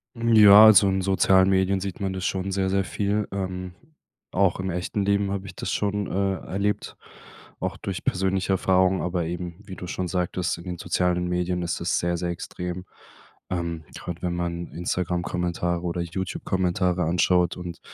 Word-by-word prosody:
Ja, 110 Hz, -3 st, +8 dB
also 105 Hz, -2 st, +7 dB
in 95 Hz, 0 st, +1 dB
sozialen 95 Hz, 0 st, +4 dB
Medien 95 Hz, 0 st, +2 dB
sieht 95 Hz, -1 st, -5 dB
man 95 Hz, -1 st, -2 dB
das 95 Hz, 0 st, -4 dB
schon 95 Hz, +1 st, -2 dB
sehr, 95 Hz, 0 st, 0 dB
sehr 95 Hz, +1 st, +1 dB
viel. 100 Hz, +2 st, -1 dB
Ähm, 90 Hz, -2 st, -4 dB, 0.6 s
auch 95 Hz, -1 st, +2 dB
im 95 Hz, 0 st, -2 dB
echten 90 Hz, +3 st, -2 dB
Leben 100 Hz, 0 st, +1 dB
habe 100 Hz, -1 st, -3 dB
ich 90 Hz, -1 st, -9 dB
das 95 Hz, -, -4 dB
schon, 100 Hz, -1 st, -1 dB
äh, 95 Hz, 0 st, 0 dB
erlebt, 100 Hz, +2 st, -2 dB, 0.6 s
auch -, -, -3 dB
durch -, -, -5 dB
persönliche 95 Hz, 0 st, 0 dB
Erfahrungen. 95 Hz, 0 st, +2 dB
Aber 90 Hz, -1 st, -1 dB
eben, 85 Hz, +1 st, -5 dB
wie 95 Hz, -, -8 dB
du 90 Hz, -, -8 dB
schon 90 Hz, 0 st, -3 dB
sagtest, 90 Hz, 0 st, -1 dB
in 85 Hz, -, -10 dB
den 90 Hz, -1 st, -5 dB
sozialen 90 Hz, +1 st, 0 dB
Medien 90 Hz, 0 st, -1 dB
ist 85 Hz, 0 st, -2 dB
es 85 Hz, -, +1 dB
sehr, 85 Hz, 0 st, -1 dB
sehr 90 Hz, +1 st, -2 dB
extrem. 90 Hz, +1 st, -5 dB, 0.6 s
Ähm, 85 Hz, -2 st, -3 dB
gerade 85 Hz, -1 st, -7 dB
wenn 90 Hz, -1 st, -2 dB
man 85 Hz, 0 st, -3 dB
Instagram-Kommentare 90 Hz, 0 st, -2 dB
oder 85 Hz, 0 st, -2 dB
YouTube-Kommentare 90 Hz, +1 st, -1 dB
anschaut 90 Hz, +1 st, +2 dB
und 90 Hz, -1 st, -7 dB
90 Hz, 170 wpm, -25 LUFS, 90-95 Hz, 0.6 s, Ja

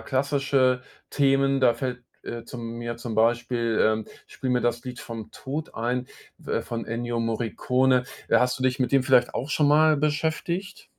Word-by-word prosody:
klassische 135 Hz, -2 st, +1 dB, 0.3 s
Themen. 135 Hz, -1 st, +2 dB
Da 120 Hz, -2 st, +5 dB
fällt, 125 Hz, -2 st, -4 dB, 0.2 s
äh, 115 Hz, -1 st, -6 dB
zu -, -, -9 dB
mir 115 Hz, 0 st, -5 dB
zum 115 Hz, -1 st, -5 dB
Beispiel, 115 Hz, 0 st, +1 dB
ähm, 110 Hz, 0 st, +1 dB, 0.2 s
„Spiel 130 Hz, -, -6 dB
mir 125 Hz, -1 st, +2 dB
das 120 Hz, 0 st, 0 dB
Lied 125 Hz, 0 st, -7 dB
vom 115 Hz, -2 st, -7 dB
Tod“ 150 Hz, +4 st, -6 dB
ein, 125 Hz, +2 st, -1 dB, 0.4 s
äh, -, -, -1 dB
von 115 Hz, -1 st, -5 dB
Ennio 120 Hz, 0 st, -2 dB
Morricone. 125 Hz, +3 st, +1 dB, 0.2 s
Äh, -, -, +5 dB
hast 125 Hz, 0 st, +1 dB
du -, -, -4 dB
dich 130 Hz, +1 st, +1 dB
mit 130 Hz, +1 st, 0 dB
dem 135 Hz, -2 st, +5 dB
vielleicht 125 Hz, -2 st, +3 dB
auch 140 Hz, -, -3 dB
schon 145 Hz, 0 st, +3 dB
mal 155 Hz, +1 st, +5 dB
beschäftigt? 160 Hz, +6 st, -2 dB
125 Hz, 175 wpm, -25 LUFS, 120-135 Hz, 0.4 s, Da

